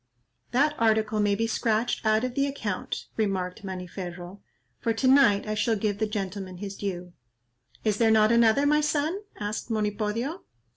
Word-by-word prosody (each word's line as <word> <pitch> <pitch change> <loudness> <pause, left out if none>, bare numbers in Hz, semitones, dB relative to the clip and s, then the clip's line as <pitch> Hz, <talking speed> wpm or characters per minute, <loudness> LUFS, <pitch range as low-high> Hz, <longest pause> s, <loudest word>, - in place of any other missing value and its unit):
"That 285 +5 +2
article 220 -1 +2
may 205 -1 +2
be 225 +3 0
scratched 225 +1 0
out 215 +1 +3
of 255 -1 -2
the 275 +2 +1
account," 225 -9 -4
remarked 190 -4 -1
Maniferro, 180 0 -7 0.4
"for 230 - 0
to 255 +4 0
night 260 -7 +5
I 215 - -1
shall 215 +2 +1
give 205 -1 -1
the 220 - +1
gentleman 195 -3 -4
his 200 +1 -6
due." 180 -3 -5 0.7
"Is 215 -2 +1
there 230 -1 +4
not 220 0 +5
another, 235 +4 +4
my 300 +1 +4
son?" 300 +4 0 0.2
asked 210 +2 -4
Monipodio. 215 - -2
215 Hz, 160 wpm, -27 LUFS, 200-235 Hz, 0.7 s, night